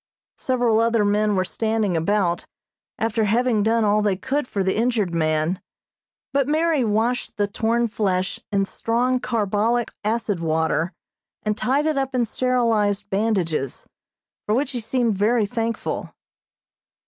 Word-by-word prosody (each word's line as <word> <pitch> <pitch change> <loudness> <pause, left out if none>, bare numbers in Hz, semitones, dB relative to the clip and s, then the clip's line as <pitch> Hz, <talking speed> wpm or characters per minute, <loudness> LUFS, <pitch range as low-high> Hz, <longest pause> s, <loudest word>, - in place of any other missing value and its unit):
Several 245 -4 +2
other 230 -2 +2
men 210 0 +2
were 185 0 +1
standing 220 -1 -1
about, 175 +1 0 0.5
after 225 0 0
having 230 +1 +2
done 225 +2 +2
all 210 0 +3
they 205 -2 +1
could 265 +7 -2
for 200 -5 -1
the 190 - 0
injured 225 -6 +1
man, 155 +2 0 0.7
but 275 -1 +2
Mary 310 -2 +2
washed 230 +3 0
the 205 - +2
torn 230 +3 0
flesh 190 -4 -1
in 195 -1 +2
strong 245 +5 0
carbolic 225 +1 0
acid 215 -3 -1
water, 160 +1 0 0.5
and 210 0 0
tied 275 +7 +1
it 310 -3 +1
up 270 -1 -2
in 245 -2 +2
sterilized 220 -5 0
bandages, 190 - -1 0.6
for 210 - +2
which 270 +2 0
he 250 - -2
seemed 235 0 0
very 215 +3 +2
thankful. 230 +1 -3
220 Hz, 140 wpm, -23 LUFS, 200-240 Hz, 0.7 s, all